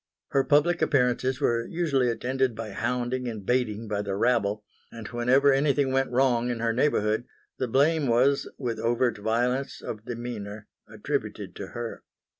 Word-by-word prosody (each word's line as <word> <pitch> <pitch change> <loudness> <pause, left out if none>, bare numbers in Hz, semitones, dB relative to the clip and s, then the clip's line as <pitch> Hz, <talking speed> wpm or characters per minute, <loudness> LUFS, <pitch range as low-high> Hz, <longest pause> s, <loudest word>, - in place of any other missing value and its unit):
Her 135 - +2
public 160 +5 +3
appearances 130 -1 +2
were 120 -5 +1
usually 145 -7 +1
attended 130 +1 0
by 110 -1 -6
hounding 125 +3 -2
and 110 -4 -6
baiting 115 -3 0
by 105 -1 -1
the 100 -1 -3
rabble; 105 -2 +1 0.3
and 115 -2 -8
whenever 130 +4 +3
anything 140 -1 +2
went 135 0 +1
wrong 125 -1 +2
in 120 - -1
her 115 0 +1
neighbourhood 115 -4 +1 0.3
the 130 - 0
blame 145 +4 +2
was, 130 +4 +2
with 120 -5 -3
overt 120 0 +1
violence 125 +5 0
of 110 -1 -7
demeanour, 110 -4 -6 0.2
attributed - - -4
to - - -6
her. 120 -1 -5
120 Hz, 155 wpm, -27 LUFS, 115-135 Hz, 0.3 s, public